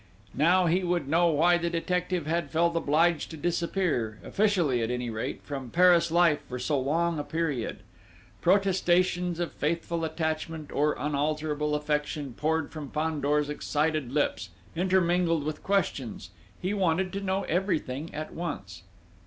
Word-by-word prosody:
Now 175 Hz, +6 st, +4 dB
he 175 Hz, +3 st, +2 dB
would 175 Hz, -4 st, 0 dB
know 170 Hz, +4 st, +3 dB
why 170 Hz, +2 st, +4 dB
the 170 Hz, 0 st, -1 dB
detective 180 Hz, 0 st, -1 dB
had 165 Hz, -1 st, -1 dB
felt 170 Hz, +3 st, +1 dB
obliged 165 Hz, +1 st, +2 dB
to 160 Hz, -, -8 dB
disappear, 170 Hz, -, -1 dB
officially 180 Hz, -, +1 dB
at 115 Hz, -, -1 dB
any 125 Hz, -1 st, -2 dB
rate, 110 Hz, 0 st, -4 dB
from 135 Hz, -4 st, -6 dB
Paris 175 Hz, +2 st, +5 dB
life 170 Hz, -2 st, +4 dB
for 125 Hz, -, -4 dB
so 135 Hz, +3 st, 0 dB
long 165 Hz, +4 st, 0 dB
a -, -, -2 dB
period. 150 Hz, -8 st, -2 dB, 0.6 s
Protestations 180 Hz, -2 st, +2 dB
of 175 Hz, -, -2 dB
faithful 165 Hz, +2 st, -2 dB
attachment, 160 Hz, -1 st, -3 dB
or 150 Hz, +1 st, +2 dB
unalterable 150 Hz, +1 st, -1 dB
affection 150 Hz, -2 st, -2 dB
poured 160 Hz, +3 st, -1 dB
from 150 Hz, -3 st, -7 dB
Fandor's 150 Hz, -1 st, 0 dB
excited 150 Hz, -2 st, -1 dB
lips, 135 Hz, -8 st, 0 dB, 0.3 s
intermingled 175 Hz, -2 st, +2 dB
with 150 Hz, +1 st, -4 dB
questions: 135 Hz, -, -1 dB, 0.3 s
he 185 Hz, +3 st, -2 dB
wanted 185 Hz, -1 st, +1 dB
to 200 Hz, -, -3 dB
know 195 Hz, 0 st, -1 dB
everything 160 Hz, -5 st, -1 dB
at 155 Hz, +1 st, -6 dB
once. 100 Hz, -, -5 dB
160 Hz, 145 wpm, -28 LUFS, 145-175 Hz, 0.6 s, Paris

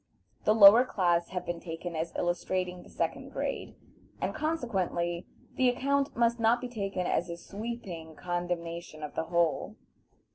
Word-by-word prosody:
The 215 Hz, -, +5 dB
lower 220 Hz, +3 st, +10 dB
class 175 Hz, -8 st, +1 dB
have 180 Hz, -1 st, -4 dB
been 175 Hz, -1 st, -3 dB
taken 170 Hz, 0 st, -6 dB
as 160 Hz, +1 st, -2 dB
illustrating 180 Hz, +1 st, -1 dB
the -, -, -15 dB
second -, -, -2 dB
grade, -, -, -4 dB, 0.4 s
and -, -, -1 dB
consequently 190 Hz, -, -1 dB, 0.3 s
the 255 Hz, -1 st, +5 dB
account 275 Hz, +3 st, 0 dB
must 235 Hz, 0 st, +3 dB
not 230 Hz, +2 st, +4 dB
be 250 Hz, -, -5 dB
taken 195 Hz, -5 st, -2 dB
as 175 Hz, 0 st, 0 dB
a 170 Hz, -, -4 dB
sweeping 195 Hz, -6 st, -6 dB
condemnation 170 Hz, -2 st, -4 dB
of 150 Hz, -, -5 dB
the -, -, -2 dB
whole. 170 Hz, -1 st, +1 dB
180 Hz, 150 wpm, -30 LUFS, 170-230 Hz, 0.4 s, lower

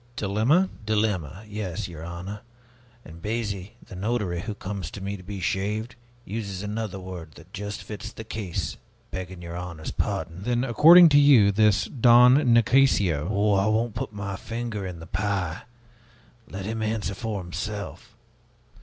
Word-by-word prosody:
"Dilemma?" 115 Hz, -, +2 dB, 0.2 s
"Dilemma, 105 Hz, -4 st, -1 dB
yes, 100 Hz, -4 st, -4 dB
your 80 Hz, -2 st, -9 dB
honor. 90 Hz, +5 st, -7 dB, 0.6 s
And 80 Hz, +2 st, -12 dB
Biasi, 105 Hz, -3 st, -3 dB
the -, -, -11 dB
notary, 100 Hz, -3 st, -1 dB
who 105 Hz, +2 st, -5 dB
comes 100 Hz, -5 st, -5 dB
to 100 Hz, -, -8 dB
me 100 Hz, +1 st, -4 dB
to 95 Hz, -, -10 dB
be 100 Hz, +1 st, -7 dB
shaved, 105 Hz, +6 st, -2 dB, 0.3 s
uses 100 Hz, -3 st, -5 dB
another 105 Hz, -2 st, -4 dB
word 90 Hz, -4 st, -8 dB
that -, -, -16 dB
just 105 Hz, 0 st, -5 dB
fits 105 Hz, -2 st, -7 dB
the 110 Hz, -, -9 dB
case, 105 Hz, -5 st, -4 dB, 0.3 s
begging 95 Hz, -1 st, -6 dB
your 85 Hz, 0 st, -7 dB
honor's 85 Hz, -3 st, -6 dB
pardon." 85 Hz, +2 st, -3 dB
"Then, 120 Hz, +3 st, 0 dB
according 165 Hz, +8 st, +8 dB
to 145 Hz, -1 st, +6 dB
you, 130 Hz, -9 st, +6 dB
this 100 Hz, -1 st, +3 dB
Don 125 Hz, 0 st, +6 dB, 0.2 s
Nicasio 110 Hz, -, +3 dB
" -, -, -1 dB
"Oh, 105 Hz, 0 st, +2 dB
I 100 Hz, +1 st, +2 dB
won't 110 Hz, +1 st, +1 dB
put -, -, -4 dB
my 100 Hz, -1 st, -5 dB
finger 115 Hz, -3 st, -4 dB
in 90 Hz, -2 st, -7 dB
the 80 Hz, -, -9 dB
pie! 95 Hz, -2 st, -2 dB, 0.9 s
Let 95 Hz, 0 st, -6 dB
him 110 Hz, +1 st, -3 dB
answer 110 Hz, -2 st, -1 dB
for 105 Hz, +1 st, -4 dB
himself. 95 Hz, +4 st, -6 dB
100 Hz, 160 wpm, -25 LUFS, 90-110 Hz, 0.9 s, according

